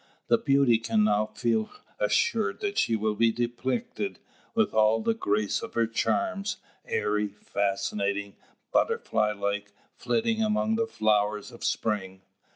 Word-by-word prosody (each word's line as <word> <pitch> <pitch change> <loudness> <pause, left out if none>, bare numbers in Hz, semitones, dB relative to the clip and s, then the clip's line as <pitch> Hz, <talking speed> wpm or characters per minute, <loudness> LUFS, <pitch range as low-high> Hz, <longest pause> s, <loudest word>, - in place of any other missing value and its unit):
The - - +5
beauty 135 -5 +4
can 115 -2 +1
now 105 0 +2
feel 110 0 0 0.3
assured 480 -1 +1
that 405 -1 -1
she 115 - +2
will 110 0 0
be 115 +2 +3
depicted 130 - -2 0.4
with 220 -1 +2
all 110 +1 +4
the 225 - +1
grace 105 - 0
of - - -8
her 115 - +3
charms, 200 - -1 0.3
airy, 105 0 0
fascinating, 100 0 -2 0.4
butterfly 105 -1 +1
like, 100 0 -3 0.2
flitting 225 -1 0
among 215 0 +1
the 225 0 0
flowers 105 - +1
of 120 - -12
spring. 95 -3 -2
110 Hz, 135 wpm, -27 LUFS, -, 0.4 s, The